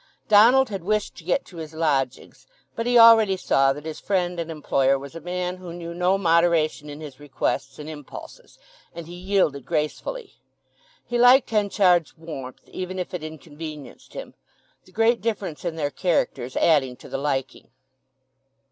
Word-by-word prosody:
Donald 240 +5 +6
had 195 -4 -5
wished 215 +3 -1
to - - -12
get - - 0
to 175 - -14
his 160 -1 -8
lodgings; 140 -6 -2 0.3
but 230 +1 -3
he 245 0 +4
already 225 -4 +7
saw 135 -6 +2
that 145 +2 -6
his 160 -1 -6
friend 180 -3 -1
and 165 -1 -4
employer 140 -3 +1
was 140 +2 -10
a 165 - -8
man 180 +2 -3
who 180 -2 -9
knew 170 -1 -7
no 180 +2 +2
moderation 165 -4 +2
in 145 +1 -9
his 145 -3 -10
requests 135 -1 -3
and 150 - -8
impulses, 150 -3 -11 0.4
and 170 -1 -7
he 170 - -10
yielded 180 -6 0
gracefully. 155 - -3 0.7
He 240 0 -2
liked 245 0 +6
Henchard's 195 -6 +2
warmth, 145 -6 -9
even 185 0 -5
if 180 0 -5
it 175 -3 -4
inconvenienced 155 -1 -10
him; - - -7 0.5
the - - -20
great 225 +1 +2
difference 205 -8 -3
in 170 -2 -3
their 145 -3 -2
characters 135 -8 -1
adding 135 -6 +3
to - - -14
the - - -4
liking. 135 -2 -3
170 Hz, 165 wpm, -24 LUFS, 150-195 Hz, 0.7 s, already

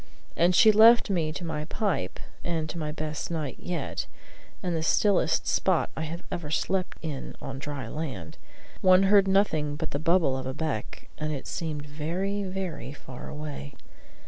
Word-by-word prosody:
And 175 +2 +4
so - - +4
she 220 -3 +8
left 225 +1 +7
me 165 -5 +1
to 175 +3 -5
my 155 -2 -3
pipe 200 +3 -1 0.2
and 165 -2 -1
to 170 - -6
my 150 -1 -2
best 155 -1 -4
night 155 -6 -3
yet, 175 -5 -3 0.6
in 180 -2 0
the 165 - 0
stillest 180 0 +3
spot 185 -4 +2
I - - -4
have 170 +3 -6
ever 170 -5 -4
slept 185 +4 0
in 150 -4 -5
on 135 0 -6
dry 140 -4 -5
land; 125 - -5 0.4
one 185 0 +6
heard 195 0 +6
nothing 160 -7 +2
but 160 +1 -4
the 145 - -1
bubble 165 -4 +3
of 130 -1 -4
a 130 - -3
beck; 150 -9 -4
and 155 0 -1
it 140 -3 -4
seemed 155 -3 -4
very, 170 +8 -2
very 185 -8 -4
far 130 -3 -9
away. 150 -2 -6
160 Hz, 175 wpm, -28 LUFS, 150-185 Hz, 0.6 s, she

